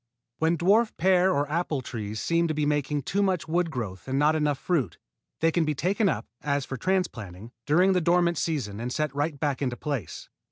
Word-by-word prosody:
When 165 +1 +2
dwarf 210 +7 +3
pear 185 +1 +4
or 145 -4 +1
apple 155 -2 -1
trees 110 -3 -5
seem 170 +5 +1
to 155 - -2
be 150 -1 0
making 145 -1 0
too 200 +9 0
much 185 -5 0
wood 170 +1 +1
growth 110 - -5
and 135 +1 -1
not 150 +2 +3
enough 150 -2 +1
fruit, 135 - -1 0.4
they 165 0 +4
can 170 0 +2
be 155 -1 -1
taken 195 +7 +1
up, 115 -9 -2 0.2
as 140 -1 -1
for 135 - -5
transplanting, 115 - -2 0.2
during 180 +6 +4
the 180 - +2
dormant 170 0 +2
season 130 -11 -2
and 120 +2 -3
set 150 0 -1
right 145 0 -2
back 145 -2 -1
into 125 -3 -1
place. 140 - -4
150 Hz, 205 wpm, -26 LUFS, 135-175 Hz, 0.4 s, pear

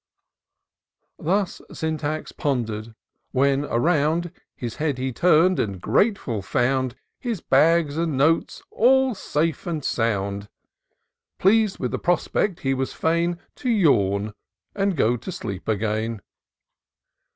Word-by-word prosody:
Thus 190 +3 0
Syntax 155 -1 -3
ponder'd 115 -5 -3 0.2
— - - -51
when 140 +1 +3
around 160 +5 +1 0.2
His 120 -2 -6
head 150 -4 -1
he 130 0 -2
tum'd, 180 +5 +4
and 100 -3 -2
grateful 135 - +1
foimd 130 +4 0 0.3
His 235 -6 -3
bags 155 +2 +3
and 165 -4 0
notes 160 +4 +1
all 265 +2 +4
safe 165 -6 -2
and 160 -5 -3
sound: 100 -3 -1 0.9
Pleas'd 210 +1 +3
with 125 - -3
the - - -2
prospect, 175 +2 0
he 135 0 +1
was 135 0 -2
fain 170 +1 0 0.2
To 255 - -3
yawn, 105 - +2 0.4
and 195 -3 0
go 120 -1 +2
to 185 - -7
sleep 100 - -6
again. 110 +1 -1
145 Hz, 120 wpm, -23 LUFS, 115-175 Hz, 0.9 s, tum'd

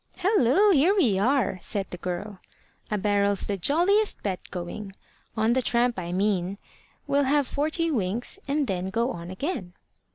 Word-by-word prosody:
"Hallo! 375 - +4
here 345 +4 +4
we 225 - +3
are!" 215 -4 +1
said 200 -2 -2
the 180 - -5
girl. 185 +3 -5 0.5
"A 210 - 0
barrel's 200 -1 +1
the 205 - -1
jolliest 355 - +2
bed 190 -3 -2
going 195 +3 -6 0.4
on 220 +2 +2
the 260 - +2
tramp, 240 -3 +1
I 175 -1 -5
mean. 190 0 0 0.5
We'll 280 0 +2
have 285 +1 +2
forty 315 +3 0
winks, 230 - 0
and 285 +1 +1
then 190 -4 -2
go 230 +5 0
on 170 0 -7
again." 185 - -4
220 Hz, 160 wpm, -26 LUFS, 190-285 Hz, 0.5 s, Hallo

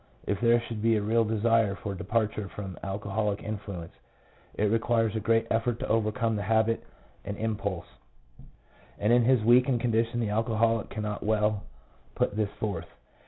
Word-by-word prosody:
If 100 -1 -2
there 120 0 +5
should 115 -2 -6
be 115 0 +3
a 105 - +1
real 115 +2 +3
desire 110 -1 +2
for 100 +2 -5
departure 105 0 -1
from 95 -3 -7
alcoholic 100 +1 -2
influence, 100 -6 -6 0.6
it - - -1
requires 115 -1 +1
a - - 0
great 115 +1 +2
effort 115 +1 +1
to - - -3
overcome 115 +1 +1
the 105 - -2
habit 110 +2 +1 0.4
and 100 0 -5
impulses, 100 -5 -3 1.1
and 105 +3 +2
in 120 - +6
his 125 -3 +4
weakened 125 +2 +4
condition 115 0 +1
the 115 -3 0
alcoholic 115 +1 +1
cannot 105 -1 -4
well 105 -1 +1 0.5
put - - 0
this 105 -2 0
forth. 90 -6 -3
110 Hz, 160 wpm, -28 LUFS, 105-115 Hz, 1.1 s, in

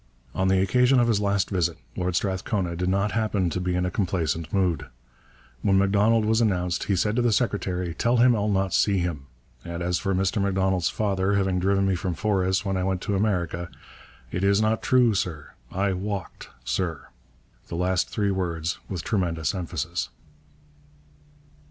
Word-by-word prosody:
On 95 - 0
the 95 0 +3
occasion 125 +7 +4
of 120 - +3
his 110 -3 +2
last 100 -1 0
visit 85 -3 0 0.2
Lord 90 -1 -1
Strathcona 95 -1 -1
did 90 +2 -1
not 100 +2 +1
happen 105 -5 0
to 90 - -2
be 90 0 -1
in 90 0 0
a 90 - -2
complaisant 85 -4 -1
mood. 90 -8 0 0.7
When 95 -1 +3
M'Donald 105 +3 +3
was 110 +2 +2
announced 90 -5 0
he 100 - +1
said 105 +4 +1
to - - +3
the 120 -1 +2
secretary: 95 -6 -1
'Tell 120 +7 +1
him 120 0 +5
I'll 105 -1 0
not 95 -2 0
see 100 -2 +3
him. 85 -6 -3 0.4
And 85 0 -5
as 90 0 0
for 95 -1 -1
Mr 95 +2 +1
M'Donald's 95 -2 +1
father 100 -2 0
having 95 -2 +1
driven 100 +1 +2
me 95 - +2
from 90 -1 -2
Forres 95 +1 0
when 95 -1 0
I 95 - -1
went 95 -1 -1
to 100 - -1
America, 90 -4 -1 0.6
it 90 - -2
is 100 +1 +4
not 110 +1 +1
true, 125 -3 +4
sir! 90 -8 -3 0.2
I 95 +1 0
walked, 100 0 -5
sir!' 85 -5 -3 0.6
the - - -6
last 90 +1 0
three 100 -2 0
words 85 -3 -2
with 90 -4 -4
tremendous 85 -8 -1
emphasis. 90 -5 -3
95 Hz, 175 wpm, -25 LUFS, 90-100 Hz, 0.7 s, him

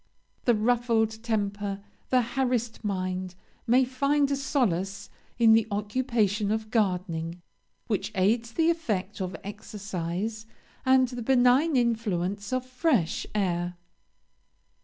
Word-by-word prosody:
The 240 - +4
ruffled 225 -1 +1
temper, 205 -3 -2 0.3
the 255 -1 +4
harassed 245 -2 -1
mind, 185 -2 -2 0.3
may 255 +3 +5
find 280 +2 +1
a - - +2
solace 205 - -1 0.3
in 230 -2 +6
the 225 -1 +4
occupation 210 -1 0
of 220 0 -2
gardening, 180 -5 -1 0.5
which 210 -2 -2
aids 225 +5 +1
the 330 +3 +3
effect 210 - -3
of 185 -2 -3
exercise 200 +1 -5 0.4
and 260 0 +5
the 245 -1 -6
benign 260 +5 +4
influence 205 -5 0
of 255 0 -1
fresh 255 - 0
air. 175 -3 -1
220 Hz, 115 wpm, -27 LUFS, 195-245 Hz, 0.5 s, in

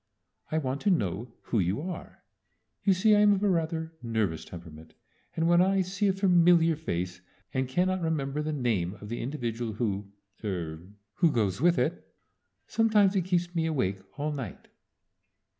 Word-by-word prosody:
"I 155 - +1
want 135 -2 -2
to 205 - +2
know 110 - 0
who 115 - 0
you 95 +5 0
are. 175 +2 -7 0.6
You 200 - +4
see 210 +3 +4
I'm 205 0 +6
of 200 0 -1
a 205 - +4
rather 160 -1 -1
nervous 110 -9 -1
temperament, 80 -2 -11 0.4
and 165 0 +1
when 175 +1 +5
I 195 +1 +3
see 190 +3 0
a 195 - +3
familiar 175 -3 +4
face 90 - -4 0.3
and 130 0 0
cannot 185 +6 +1
remember 150 -3 -1
the 155 +1 -2
name 110 - 0
of 105 0 -10
the 120 - -3
individual 120 -4 -3
who 100 -3 -2 0.3
er 85 -6 -3 0.4
who 170 -3 +4
goes 105 -4 0
with 175 +1 +4
it, - - -2 0.5
sometimes 210 -3 +3
it 185 -3 +1
keeps 175 -1 0
me 165 -2 0
awake 100 -12 0 0.2
all 150 +1 -1
night." 130 -10 -7
150 Hz, 165 wpm, -28 LUFS, -, 0.6 s, I'm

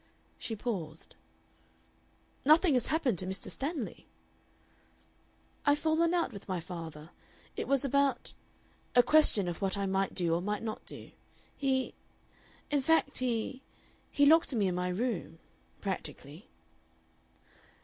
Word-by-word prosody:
She 225 - -3
paused. 180 -9 -5 1.3
"Nothing 310 +3 +5
has 250 - +2
happened 275 - +1
to 185 - -3
Mr. 190 +1 -4
Stanley?" 280 -4 -4 1.6
"I've 285 0 +4
fallen 325 +3 +2
out 335 -8 0
with 200 - -10
my 185 -2 -1
father. 165 -2 -8 0.4
It - - -3
was 275 0 +2
about 280 0 +1 0.6
a 245 - +8
question 270 -12 +5
of 175 +1 -4
what 195 0 0
I 200 - -1
might 195 0 0
do 170 -2 +1
or 170 - +1
might 210 +3 -2
not 220 -1 -4
do. - - -9 0.4
He 265 -2 0 0.8
In 290 -1 +2
fact, 320 -1 +2
he 255 +1 -1 0.5
he 285 - +3
locked 315 -2 +5
me 210 -3 +2
in 185 - +1
my 180 0 -1
room. 185 -4 -2 0.4
Practically." 180 -4 -5
225 Hz, 130 wpm, -31 LUFS, 185-280 Hz, 1.6 s, a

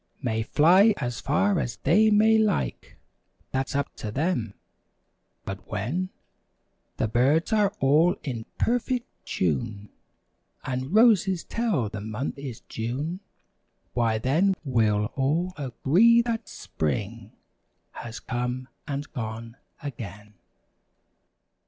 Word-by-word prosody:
May 110 -5 -1
fly 185 - +5
as 125 -4 -3
far 190 +6 +2
as 120 - -2
they 210 +9 +4
may 220 +1 +5
like. 215 -3 -1 0.5
That's 135 +1 -2
up 140 0 -1
to 110 - -5
them. 125 - -1 0.9
But 95 -1 -7
when 130 - -2 0.9
The - - +1
birds 140 - +2
are 205 -2 +3
all 155 +6 +4
in 120 -6 -5
perfect 245 +1 0 0.2
tune 100 +6 -2 0.8
And 130 +2 -3
roses 200 -6 +5
tell 210 - 0
the 105 0 -6
month 110 +7 -4
is 130 -5 -7
June. 135 +10 -4 0.7
Why 115 -2 +1
then 160 - +2
we'll 110 -6 +2
all 160 +7 0
agree 165 - +4
that 230 -1 -3
Spring 80 -5 -4 0.6
Has 120 0 -8
come 125 +1 -3 0.2
and 145 0 -4
gone 115 -2 -5 0.3
again. 105 -6 -8
135 Hz, 110 wpm, -26 LUFS, 115-185 Hz, 0.9 s, fly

